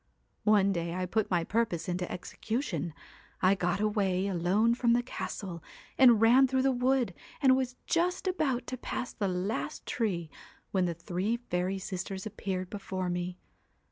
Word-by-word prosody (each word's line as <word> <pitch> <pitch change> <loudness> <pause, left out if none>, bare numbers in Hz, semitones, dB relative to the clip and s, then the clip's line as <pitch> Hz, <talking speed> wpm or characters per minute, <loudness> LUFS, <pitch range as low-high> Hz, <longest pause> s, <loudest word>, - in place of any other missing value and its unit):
' - - -44
One 205 -2 +5
day 170 -2 -2
I 185 0 -1
put 215 +4 0
my 175 -3 +2
purpose 205 -3 0
into 180 0 -2
execution, 180 - -3 0.4
I 185 +1 +5
got 180 -1 0
away 200 -3 +1
alone 195 +5 +2
from 235 -1 +3
the 245 +1 +2
castle, 190 -8 -5 0.3
and 245 -4 +7
ran 245 +4 +6
through 260 0 +1
the 270 - +4
wood, 250 -4 +1 0.3
and 265 -3 +6
was 255 -1 -1
just 350 +3 +1
about 305 -9 0
to 255 - -5
pass 250 0 -4
the 200 - -1
last 185 +4 -2
tree 175 -9 -1 0.4
when 185 -2 +2
the 170 -1 -1
three 185 +7 -1
fairy 185 -4 -2
sisters 190 0 -5
appeared 190 -3 -4
before 190 -3 -3
me. 180 0 -3
200 Hz, 165 wpm, -30 LUFS, 180-240 Hz, 0.4 s, and